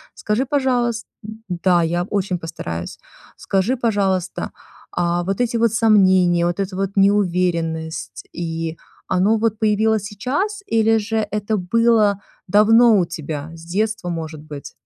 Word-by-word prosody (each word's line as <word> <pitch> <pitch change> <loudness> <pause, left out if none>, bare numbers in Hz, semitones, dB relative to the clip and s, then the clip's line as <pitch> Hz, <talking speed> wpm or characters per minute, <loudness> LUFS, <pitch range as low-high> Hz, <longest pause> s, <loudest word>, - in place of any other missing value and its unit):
Скажи, 215 +5 -1
пожалуйс 245 -5 0 0.4
Да, 175 -1 +2
я 175 +2 0
очень 190 -2 -2
постараюсь. 85 - -6 0.4
Скажи, 195 +7 0
пожалуйста, 195 -6 -1 0.4
а 175 0 0
вот 195 +5 -2
эти 240 -1 0
вот 230 -1 +2
сомнения, 190 -6 +4
вот 175 +2 -1
эта 195 -1 -2
вот 195 0 -2
неуверенность, 175 -5 0
и 165 -1 -4 0.3
оно 200 +5 +3
вот 220 -1 0
появилось 220 -1 +2
сейчас, 280 - -3
или 225 - +3
же 220 0 -1
это 210 +1 -1
было 210 +1 +2 0.3
давно 220 +3 +5
у 180 - +2
тебя, 155 -1 -6
с 165 - -12
детства, 205 0 -2
может 160 -2 -5
быть? 150 -2 -9
195 Hz, 135 wpm, -20 LUFS, 175-220 Hz, 0.4 s, давно